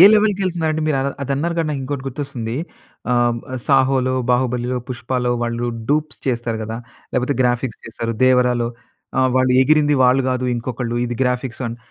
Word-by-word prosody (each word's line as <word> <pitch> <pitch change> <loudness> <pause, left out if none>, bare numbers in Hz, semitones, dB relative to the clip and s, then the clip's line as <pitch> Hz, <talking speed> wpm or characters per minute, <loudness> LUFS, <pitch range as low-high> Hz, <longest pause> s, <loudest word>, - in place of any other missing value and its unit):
ఏ - - +11
లెవెల్‌కి 210 -2 +3
వెళ్తున్నారు 170 -3 0
అంటే 155 0 -1
మీరు 150 -3 +2 0.3
అది 140 - -4
అన్నారు 170 +4 -1
కానీ 165 - +1
నాకు 140 -2 -2
ఇంకోటి 135 0 -4
గుర్తొస్తుంది. 125 -4 -4 0.5
ఆ! - - +3 0.5
సాహో‌లో, 130 -2 +3 0.2
బాహుబలిలో, 125 0 +1
పుష్పాలో 125 0 -2
వాళ్ళు 120 0 -1 0.2
డూప్స్ 155 +1 0
చేస్తారు 120 -3 -1
కదా. 110 +1 -4 0.4
లేకపోతే 125 +2 +1
గ్రాఫిక్స్ 120 -2 0
చేస్తారు. 115 +1 -4
దేవరాలో 125 -2 +3 0.5
ఆ! - - +5 0.2
వాళ్ళు 130 0 +3
ఎగిరింది 150 +1 +4
వాళ్ళు 130 +2 +4
కాదు, 130 0 -1
ఇంకొకళ్ళు 120 0 -3
ఇది 120 -1 -4
గ్రాఫిక్స్ 125 0 -1
అని 115 - -5
130 Hz, 160 wpm, -20 LUFS, 120-140 Hz, 0.5 s, ఏ